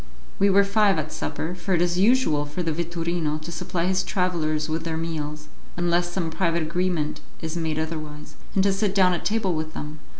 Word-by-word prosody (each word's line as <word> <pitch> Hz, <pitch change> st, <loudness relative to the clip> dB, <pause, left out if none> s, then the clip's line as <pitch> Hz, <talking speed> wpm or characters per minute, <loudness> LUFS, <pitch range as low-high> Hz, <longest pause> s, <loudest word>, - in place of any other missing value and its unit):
We 200 Hz, -, +5 dB
were 200 Hz, +1 st, +6 dB
five 200 Hz, -1 st, +3 dB
at 155 Hz, 0 st, -2 dB
supper, 160 Hz, +3 st, -3 dB
for 180 Hz, +1 st, -1 dB
it 170 Hz, -, +1 dB
is 175 Hz, 0 st, 0 dB
usual 205 Hz, -, +4 dB
for 150 Hz, +5 st, -3 dB
the 165 Hz, -, 0 dB
vetturino 170 Hz, -1 st, -1 dB
to 170 Hz, -, -6 dB
supply 170 Hz, +1 st, -2 dB
his 185 Hz, 0 st, +2 dB
travellers 170 Hz, -5 st, 0 dB
with 160 Hz, +1 st, -2 dB
their 160 Hz, -1 st, -2 dB
meals, 155 Hz, -2 st, -4 dB, 0.3 s
unless 175 Hz, 0 st, +1 dB
some 175 Hz, -3 st, -2 dB
private 170 Hz, -1 st, +1 dB
agreement 170 Hz, -2 st, -1 dB, 0.2 s
is 160 Hz, 0 st, -4 dB
made 160 Hz, -2 st, -1 dB
otherwise, 155 Hz, -2 st, -5 dB, 0.2 s
and 190 Hz, -, +4 dB
to 200 Hz, 0 st, +3 dB
sit 195 Hz, 0 st, 0 dB
down 185 Hz, -2 st, +5 dB
at 175 Hz, -, -2 dB
table 205 Hz, -4 st, +1 dB
with 155 Hz, 0 st, -3 dB
them. 150 Hz, +1 st, -6 dB
170 Hz, 200 wpm, -25 LUFS, 155-185 Hz, 0.3 s, were